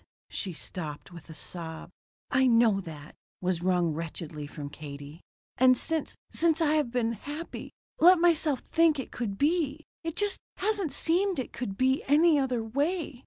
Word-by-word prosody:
She 190 - -3
stopped 155 -2 -5
with 170 -2 -12
a 160 - -9
sob. 160 +1 -6 0.4
"I 260 0 +4
know 230 -4 +4
that," 155 -4 -10 0.3
was 180 -2 -1
wrung 175 -3 +2
wretchedly 155 -2 -6
from 145 -1 -8
Katie. 145 +2 -9 0.4
"And 255 0 +6
since 320 +3 -1 0.2
since 325 -1 +3
I 310 -2 +3
have 300 -5 +1
been 235 -1 0
happy 290 - -7 0.3
let 360 +3 +8
myself 325 -5 +3
think 325 -2 +3
it 265 - -5
could 210 -5 -4
be 310 - 0 0.2
it 330 -1 -4
just 410 -1 0 0.2
hasn't 395 -5 0
seemed 365 +3 +1
it 260 - -4
could 200 -6 -5
be 260 +1 +2
any 305 +2 +5
other 255 -4 0
way. 285 +4 -2
255 Hz, 165 wpm, -28 LUFS, -, 0.4 s, let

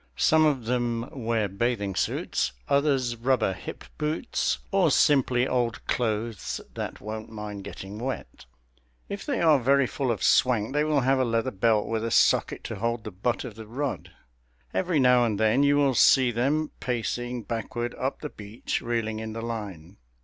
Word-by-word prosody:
Some 155 0 +4
of 135 -6 0
them 120 0 -1
wear 115 -4 -1
bathing 100 0 -1
suits; - - -1
others 140 -4 +2
rubber 120 -4 +1
hip - - -8 0.2
boots, 150 - -1
or - - +4
simply 130 -3 +3
old 120 -2 -1
clothes 110 -3 -2
that - - -5
won't 110 +1 -6
mind 105 -2 -7
getting 100 +2 -8
wet. 130 +2 -5 0.6
If 200 - -6
they 280 -4 0
are 155 -4 +5
very 140 +2 +3
full 135 +1 -2
of 110 -5 -1
swank 120 -2 +3
they 150 +1 +2
will 150 -2 +2
have 135 +1 +2
a - - +3
leather 115 +1 0
belt 110 +1 +2
with 115 -1 -2
a 115 - -1
socket - - +3
to - - -5
hold 115 +2 -2
the 110 - -6
butt 105 +6 -2
of 125 -4 -7
the 110 0 -10
rod. 135 +4 -4 0.6
Every 175 -4 +1
now 125 -2 +5
and 110 -4 0
then 110 +4 +3
you 145 0 +4
will 140 -2 +3
see 125 +1 +5
them 140 +7 0
pacing 120 0 -3
backward 120 +2 -4
up 130 +2 -3
the 150 - -4
beach, 105 0 -5
reeling 115 -2 -2
in 110 0 -5
the 115 - -5
line. 100 -6 -6
120 Hz, 175 wpm, -26 LUFS, 110-135 Hz, 0.6 s, are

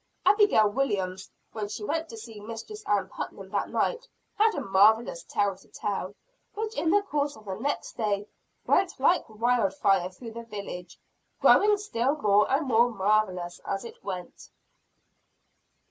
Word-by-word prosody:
Abigail 410 - +5
Williams, 200 -6 -2 0.2
when 215 -2 -4
she 210 +1 -6
went 320 +8 -2
to 225 - -9
see 225 -1 -10
Mistress 230 - -8
Ann 200 -2 +1
Putnam 190 0 -7
that 200 - -1
night, - - -1 0.3
had 440 +1 +3
a - - -2
marvelous 220 - +3
tale 200 - 0
to 190 - -21
tell; 200 -1 -4 0.4
which 440 +1 -3
in 325 - 0
the 405 +3 +4
course 290 -6 -1
of 215 - -16
the 195 - -4
next 275 +9 -3
day, 205 -3 0 0.4
went 380 -7 +2
like 315 +1 +3
wildfire 200 -5 +2
through 225 +5 -10
the 235 +1 -7
village, 200 -5 -8 0.4
growing 415 0 +6
still 280 - 0
more 210 -7 +3
and 280 +3 +2
more 235 0 +4
marvelous 190 -5 0
as 195 +3 -3
it 235 - -11
went. 180 -3 -7
220 Hz, 155 wpm, -27 LUFS, 200-285 Hz, 0.4 s, growing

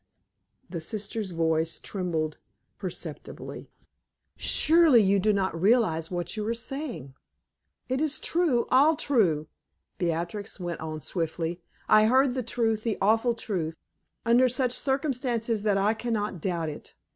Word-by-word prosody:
The 170 -3 -5
sister's 210 +3 -3
voice 165 -1 0
trembled 165 -5 -3 0.4
perceptibly. - - -7 0.7
"Surely 320 -5 +5
you 195 +1 +3
do 215 +3 +3
not 190 -5 -1
realize 190 -7 +3
what 175 +2 -3
you 215 - -3
are 230 - 0
saying!" 230 - -5 0.7
"It 260 +2 -1
is 305 -1 0
true 320 -9 +1
all 290 +5 +5
true," 195 - +1 0.5
Beatrix 175 +5 -2
went 175 -2 -4
on 155 -1 -5
swiftly. 165 +2 -3 0.3
"I 215 0 +6
heard 260 +2 +4
the 255 - -1
truth, 225 -2 0
the 225 -1 -2
awful 225 +4 +2
truth, 165 -8 -3 0.5
under 245 +2 +5
such 250 0 +1
circumstances 250 -5 -1
that 205 -2 +2
I 200 +2 +2
can 235 +1 -3
not 205 -5 -2
doubt 170 -3 -1
it. 150 - -10
210 Hz, 135 wpm, -27 LUFS, 170-245 Hz, 0.7 s, I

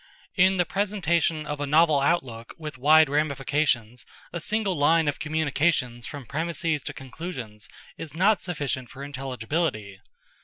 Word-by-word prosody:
In 190 0 +4
the 180 - +3
presentation 170 -6 0
of 150 -1 -4
a 145 - -1
novel 155 0 +4
outlook 135 -6 -1
with 150 -5 -7
wide 155 +3 +6
ramifications 140 -4 0 0.3
a 170 - -3
single 210 +2 -1
line 160 +2 +3
of 145 - -1
communications 155 -5 0
from 145 -3 -8
premises 160 +2 -2
to - - -4
conclusions 130 -6 -8 0.3
is 160 -2 -7
not 200 +5 +3
sufficient 140 -8 -3
for 135 - -9
intelligibility. 130 - -3
150 Hz, 140 wpm, -26 LUFS, 135-165 Hz, 0.3 s, wide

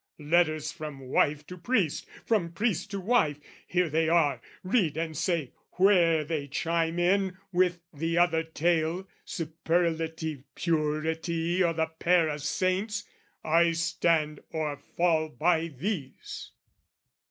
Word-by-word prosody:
"Letters 155 0 +1
from 150 -3 -7
wife 145 +3 +1
to 180 +2 -10
priest, 195 - 0 0.2
from 180 -7 +1
priest 200 -1 -1
to 200 0 -4
wife, 195 - +2 0.3
"Here 180 -1 +1
they 160 +1 +1
are, 145 -7 +3 0.2
read 185 - +1
and 160 -1 -2
say 165 -4 -1 0.2
where 175 -5 +4
they 150 -2 -3
chime 165 +4 -1
in 185 +1 +2
"With 180 -1 +2
the 165 +3 -1
other 175 -2 +4
tale, 165 +2 0 0.2
superlative 160 -2 -1
purity 165 +2 0
"O' 170 -1 +2
the 160 0 -1
pair 170 -2 +3
of 150 -1 -4
saints! 195 +7 -1 0.4
I 165 +1 +3
stand 160 -2 +1
or 155 -2 -2 0.2
fall 160 -2 +2
by 165 +2 +1
these." 155 - -5
165 Hz, 125 wpm, -28 LUFS, 155-180 Hz, 0.4 s, where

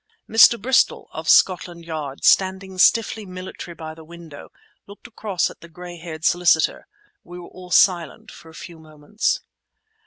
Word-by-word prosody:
Mr. 225 +1 +6
Bristol, 250 +5 +1
of - - -6
Scotland 175 -2 +2
Yard, 150 -4 -7
standing 190 0 +1
stiffly 220 +2 +2
military 185 -2 -9
by 160 -1 -8
the 160 0 -14
window, 165 -2 -13 0.4
looked 200 +1 -15
across 215 -6 -3
at - - -18
the 170 - -14
gray 175 +1 -11
haired 160 -1 -8
solicitor. 170 -3 +1 0.4
We 175 +1 -12
were 175 - -11
all 180 -1 -13
silent 175 -3 +1
for 165 - -15
a 160 - -16
few 170 -1 -11
moments. 155 +6 -3
175 Hz, 155 wpm, -21 LUFS, 160-190 Hz, 0.4 s, Mr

